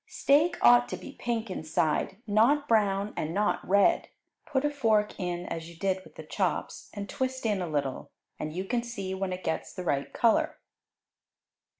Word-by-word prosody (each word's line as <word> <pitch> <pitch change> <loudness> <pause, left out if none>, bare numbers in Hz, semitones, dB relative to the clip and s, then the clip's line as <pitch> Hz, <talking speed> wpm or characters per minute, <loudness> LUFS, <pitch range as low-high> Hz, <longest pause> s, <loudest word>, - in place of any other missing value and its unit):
Steak 300 +5 +3
ought 245 0 +7
to - - -4
be - - -9
pink 230 -5 -3
inside; 155 +2 -1
not 235 +8 +3
brown 205 -2 +2
and 155 +3 -3
not 210 +1 +1
red. 200 +1 +3 0.4
Put 275 0 0
a 295 - +1
fork 220 -8 +1
in 175 -1 -3
as 165 -1 -5
you 170 - -13
did 190 0 -1
with - - -17
the - - -8
chops, - - -2
and 205 -1 -6
twist 260 +3 -3
in 205 -4 +1
a 180 - -2
little, 140 -3 -2 0.3
and 155 - -3
you 185 +4 -4
can 240 +4 0
see 200 -6 -5
when 190 0 -2
it 180 0 -5
gets 160 - -2
the 185 - -6
right 140 -5 -1
color. 310 +7 +2
200 Hz, 185 wpm, -28 LUFS, 180-240 Hz, 0.4 s, ought